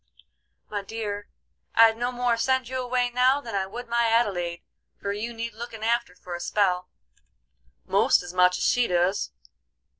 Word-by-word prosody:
"My 205 -1 -3
dear, 205 0 -5 0.5
I'd 225 -1 +7
no 240 +2 -2
more 245 -1 +1
send 260 +1 +1
you 260 +1 -3
away 245 0 0
now 255 +3 +3
than 235 -6 -8
I 195 -1 0
would 240 +5 -7
my 235 0 +2
Adelaide, 185 -7 0 0.4
for 200 0 -2
you 220 +3 -4
need 230 0 -5
looking 225 -1 -8
after 235 -4 0
for 180 -1 -9
a 175 - -4
spell, 180 -1 0 1.0
most - - +3
as 175 0 -8
much 180 0 +4
as - - -3
she 245 -1 +3
doos. 180 +3 +1
225 Hz, 170 wpm, -26 LUFS, 190-240 Hz, 1.0 s, I'd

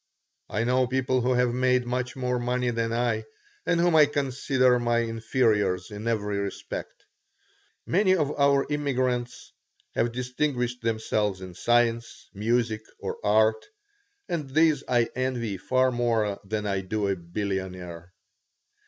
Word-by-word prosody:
I 110 - -1
know 125 +1 +2
people 130 0 +1
who 125 +1 +1
have 125 -1 +2
made 125 0 +2
much 125 +2 -2
more 125 -1 -1
money 125 0 0
than 115 -1 -1
I 115 -2 0 0.4
and 175 - +2
whom 175 -1 +3
I 150 -2 +7
consider 130 -3 +1
my 120 0 +1
inferiors 110 -4 0
in 105 +2 -6
every 105 -3 -1
respect. 100 -1 -6 0.8
Many 190 +1 +3
of 150 -5 0
our 140 -1 +4
immigrants 130 -4 -1 0.4
have 115 - +1
distinguished 125 0 -2
themselves 110 -3 -1
in 95 -1 -9
science, 115 +3 0
music, 110 +1 0 0.2
or - - -6
art, 110 +1 +3 0.6
and 155 -5 -3
these 155 0 +3
I 120 -1 +3
envy 120 -5 -2
far 130 +5 +2
more 115 -4 0
than 105 +1 -3
I 100 -2 0
do 100 +2 -2
a 100 - +1
billionaire. 90 -1 -5
120 Hz, 135 wpm, -26 LUFS, 110-130 Hz, 0.8 s, I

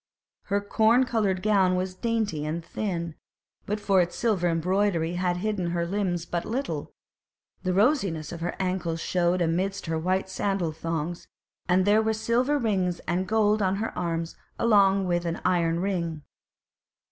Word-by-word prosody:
Her 200 0 0
corn 220 +4 +3
coloured 205 -7 0
gown 195 -4 +3
was 185 0 -2
dainty 215 -6 -1
and 160 +2 -3
thin, 185 -2 -2
and 165 -2 -7 0.5
but 210 +1 -1
for 200 -2 +3
its 175 0 -2
silver 195 -7 +1
embroidery 175 0 +1
had 180 0 0
hidden 200 -2 -1
her 170 0 -1
limbs 175 -2 -1
but 170 0 -2
little; 260 +5 -4 0.7
the 185 - -1
rosiness 195 - +1
of 170 -1 -7
her 175 - -2
ancles 180 -3 -1
showed 175 +1 +1
amidst 190 +4 -1
her 160 -1 -1
white 185 +3 0
sandal 190 -3 -1
thongs, 165 +1 -4 0.4
and 185 +1 +4
there 210 +2 +5
were 220 0 +1
silver 240 +6 +1
rings 190 -8 0
and 180 +3 -1
gold 215 0 +2
on 190 -1 +2
her 215 +3 -3
arms 165 -1 -2 0.2
along 200 -3 +4
with 175 -1 +1
the 170 -1 -3
iron 170 -1 +1
ring. 170 -6 -2
185 Hz, 160 wpm, -26 LUFS, 170-205 Hz, 0.7 s, there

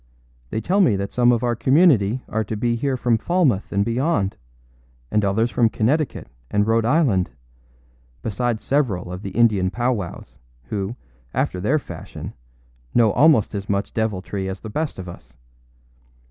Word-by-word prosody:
They 110 - -2
tell 190 - +2
me 140 - +4
that 100 0 -3
some 120 0 +4
of 120 0 +1
our 120 -1 +1
community 130 - +3
are 110 +1 -1
to 110 - -4
be 120 +2 0
here 130 +2 -1
from 120 -2 +1
Falmouth 145 - +1
and 100 0 +1
beyond, 115 - 0 0.8
and 105 - +2
others 110 +4 +1
from 115 +1 +3
Connecticut 130 +8 0 0.2
and 105 0 +2
Rhode 115 0 +2
Island, 120 - +2 0.9
besides 115 +1 -1
several 110 -12 0
of 90 +1 -6
the 100 - -5
Indian 105 -4 +2
powwows, 120 -4 -3 0.3
who, 100 +2 -3 0.4
after 90 - 0
their 130 +11 +2
fashion, 145 - -8 0.6
know 115 -3 +5
almost 145 -3 +4
as 100 -1 -5
much 100 0 -1
deviltry 100 -3 -2
as 95 0 -6
the 110 - -7
best 155 +4 -2
of 95 -1 -7
us. 85 -7 -12
110 Hz, 160 wpm, -22 LUFS, 100-125 Hz, 0.9 s, know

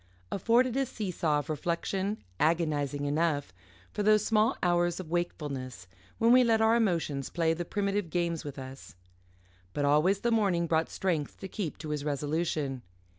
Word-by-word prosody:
afforded 235 +5 +2
a 270 - +2
see 220 -7 -4
saw 155 -3 +1
of 145 - -3
reflection, 180 +6 -2 0.2
agonising 150 -3 +1
enough, 145 0 0 0.4
for 210 - -3
those 215 0 +4
small 225 +3 +2
hours 175 0 +2
of 170 -4 -7
wakefulness 140 - -3 0.3
when 230 +1 +4
we 255 +1 +7
let 225 -2 +3
our 220 +1 +4
emotions 165 - 0
play 165 -2 +1
the 175 +2 -3
primitive 200 0 -1
games 170 -1 -1
with 145 -1 -7
us. 130 -4 -9 0.8
But 145 - 0
always 155 +8 +3
the 235 - +1
morning 195 -7 +2
brought 160 0 +1
strength 165 -6 -2
to 195 - -5
keep 185 -4 -4
to 155 - -7
his 150 -1 -2
resolution. 145 -2 -1
170 Hz, 165 wpm, -29 LUFS, 150-205 Hz, 0.8 s, we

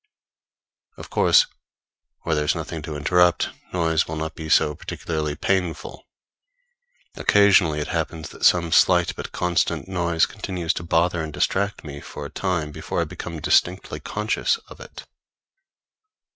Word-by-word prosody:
Of - - -11
course, - - +5 0.8
where 80 - -1
there 75 -1 0
is - - +1
nothing 80 - -5
to 75 0 -6
interrupt, 90 +3 +3 0.2
noise 80 -2 +1
will 80 - -4
not 80 0 -4
be 80 -1 -7
so 75 - +4
particularly 75 0 -4
painful. 90 -2 -2 1.1
Occasionally 95 -7 +4
it 75 - -4
happens 80 -1 -3
that - - -12
some 85 -2 +4
slight 90 0 +4
but - - -7
constant 90 +1 0
noise 85 -3 +1
continues 90 -6 -3
to - - -5
bother 85 +1 +1
and 80 -1 -5
distract 100 +7 -1
me 70 -1 -8
for 75 - -8
a 70 - -8
time 85 -5 -2
before - - -4
I - - +2
become 85 -2 -7
distinctly 90 +2 +1
conscious 105 - -1
of - - -13
it. - - -11
85 Hz, 145 wpm, -23 LUFS, 80-90 Hz, 1.1 s, course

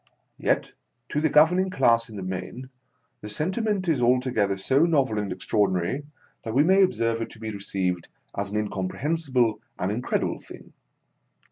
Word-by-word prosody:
Yet, - - 0 0.4
to 150 - 0
the 160 - +2
govern 160 +5 +5
ing 190 0 +1
class 115 -10 +2
in 110 - -10
the 95 - -5
main, 115 +8 -6 0.5
the 105 - -7
sentiment 190 - -1
is 155 -7 +2
alto 125 +1 +3
gether 100 -4 +1
so 135 - +3
novel 135 -10 +2
and 105 -1 -3
extraordinary, 100 +6 0 0.4
that 115 -1 -4
we 140 - +5
may 190 +4 +5
observe 115 - +1
it 115 - -3
to 115 - -14
be 110 -1 -5
received 95 -3 -2 0.3
as 100 0 -2
an 105 - -2
in 105 -1 -1
comprehensible 120 - 0 0.2
and 90 +2 -1
incredible 120 +4 -1
thing. - - -13
115 Hz, 170 wpm, -25 LUFS, 100-150 Hz, 0.5 s, govern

